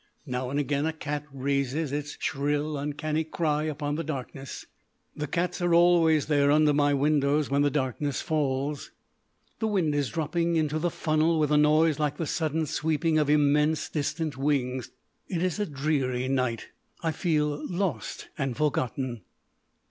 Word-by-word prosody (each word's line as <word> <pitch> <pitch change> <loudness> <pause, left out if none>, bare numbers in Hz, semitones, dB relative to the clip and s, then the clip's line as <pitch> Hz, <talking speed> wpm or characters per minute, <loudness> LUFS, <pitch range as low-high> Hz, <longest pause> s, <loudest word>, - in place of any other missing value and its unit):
Now 125 -2 -3
and 140 +2 -1
again 145 +1 0
a 160 - -1
cat 150 -1 -4
raises 140 +2 -1
its 145 0 -4
shrill, 145 +2 -1
uncanny 150 +2 -2
cry 155 -1 -1
upon 145 -1 -2
the 165 - -2
darkness. 135 -2 -6 0.5
The 150 - -3
cats 180 +3 -1
are 175 -1 +3
always 170 -3 +5
there 145 -2 +3
under 150 0 +4
my 145 0 +3
windows 145 0 +2
when 140 0 +3
the 145 - +3
darkness 140 0 -1
falls. 145 -2 -1 0.7
The 220 - 0
wind 185 -8 +1
is 145 -3 0
dropping 170 +1 0
into 155 -1 +1
the 175 +2 +1
funnel 155 +1 +1
with 150 -1 +1
a - - +4
noise 155 +1 +4
like 150 -1 0
the 165 - -2
sudden 160 0 -1
sweeping 155 +2 +1
of 150 -1 +1
immense 150 +1 +3
distant 150 0 -2
wings. 130 -3 0 0.4
It 175 -3 -2
is 185 +1 -1
a 205 - 0
dreary 135 -4 -1
night. 125 -4 -1 0.3
I 165 - +1
feel 150 -2 0
lost 175 - -3
and 135 -3 -2
forgotten. 130 -5 -1
150 Hz, 160 wpm, -27 LUFS, 140-160 Hz, 0.7 s, always